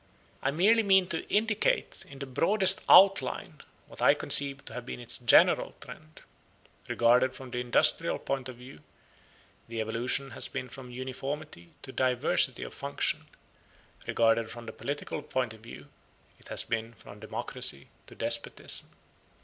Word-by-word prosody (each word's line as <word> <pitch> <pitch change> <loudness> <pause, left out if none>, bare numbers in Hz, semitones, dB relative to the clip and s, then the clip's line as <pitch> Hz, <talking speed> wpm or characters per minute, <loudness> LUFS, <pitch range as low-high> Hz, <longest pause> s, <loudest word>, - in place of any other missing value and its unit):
I 135 - 0
merely 200 +10 +3
mean 190 -3 +4
to 165 - -4
indicate 215 0 0
in 140 - -12
the 140 - -6
broadest 190 +8 +4
outline 195 -10 +4 0.2
what - - -13
I - - +5
conceive 140 0 +1
to - - -9
have 125 - -6
been 125 - -8
its 120 - -1
general 120 - +4
trend. 155 0 -13 0.6
Regarded 125 +2 +2
from 130 -2 -11
the 125 - -3
industrial 125 -1 +2
point 135 -2 -4
of 125 - -9
view 125 +2 -14 0.9
the 115 0 -6
evolution 120 +5 -2
has - - +2
been 130 -2 -6
from 130 +1 -11
uniformity 130 - -7
to 130 - -8
diversity 130 -2 +2
of - - -8
function: - - -3 0.8
regarded 115 -1 +1
from 120 0 -10
the - - -8
political 145 +1 -5
point 125 -5 -3
of 110 - -16
view, 75 -11 -12 0.5
it - - -18
has - - 0
been 115 +1 -4
from 100 +1 -14
democracy 110 - -3 0.2
to - - -14
despotism. - - -1
130 Hz, 150 wpm, -28 LUFS, 120-145 Hz, 0.9 s, I